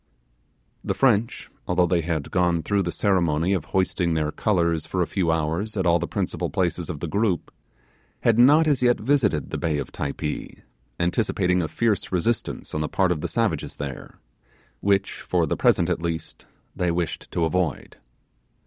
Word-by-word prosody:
The - - -1
French, 115 -4 +1 0.2
although 90 0 +3
they 85 0 +1
had 80 -3 -3
gone 85 -3 +1
through 100 -1 +1
the 85 -2 -2
ceremony 85 -2 +1
of 90 -6 -1
hoisting 90 -3 0
their 75 -1 0
colours 85 -6 0
for 90 -1 0
a - - -1
few 90 -3 0
hours 80 +7 -1
at 95 - 0
all 85 0 +4
the - - -3
principal - - -2
places 90 -1 -1
of 75 -5 -5
the - - -2
group, 100 +1 0 0.7
had 115 0 +3
not 145 +6 +6
as 145 -4 +2
yet 120 -1 +3
visited 110 - +1
the - - -3
bay 80 -2 0
of 70 - -5
Typee, 75 +1 -5 0.4
anticipating 90 0 +1
a 80 - -1
fierce 110 +6 0
resistance 95 +6 -1
on 75 - -1
the 75 - -2
part 95 -2 +2
of 80 -4 -1
the - - -2
savages - - -1
there, 70 -2 -7 0.6
which 100 -1 0
for - - +1
the - - -1
present 85 - +3
at 90 -2 -1
least 85 -1 -5 0.3
they 90 -1 0
wished 85 -1 -2
to 85 - 0
avoid. 80 -3 -2
90 Hz, 175 wpm, -24 LUFS, 80-100 Hz, 0.7 s, not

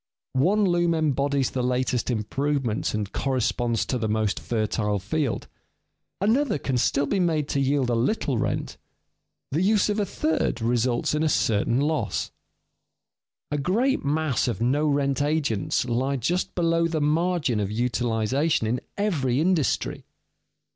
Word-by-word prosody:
One 185 +11 +3
loom 175 -2 +2
embodies 140 -3 +1
the 130 - -2
latest 125 -1 0
improvements 125 +1 -1
and 105 -2 -3
corresponds 120 -3 0
to 125 - -2
the 110 - -1
most 110 -1 0
fertile 105 -2 -1
field; 130 +7 -2 0.7
another 225 - +2
can 130 -3 -1
still 140 +4 +2
be 190 +8 0
made 160 -5 +1
to 140 - 0
yield 135 -2 +1
a - - +1
little 125 - 0
rent; - - -2 0.7
the 155 +5 0
use 210 +1 +3
of 210 +1 0
a 205 - +1
third 155 -7 -1
results 120 +3 0
in 155 +1 +1
certain 115 -1 +1
loss. 155 +2 -1 1.2
A 150 - 0
great 230 - +1
mass 145 -2 0
of 120 - -2
no 140 +6 +1
rent 140 -1 +1
agents 145 -9 0
lie 130 +3 0
just 170 +9 -1
below 165 -1 +2
the 160 -1 -1
margin 150 -4 +1
of 100 -2 -1
utilization 120 +5 0
in 120 +3 -1 0.2
every 145 -12 0
industry. 165 -4 0
140 Hz, 140 wpm, -25 LUFS, 120-160 Hz, 1.2 s, One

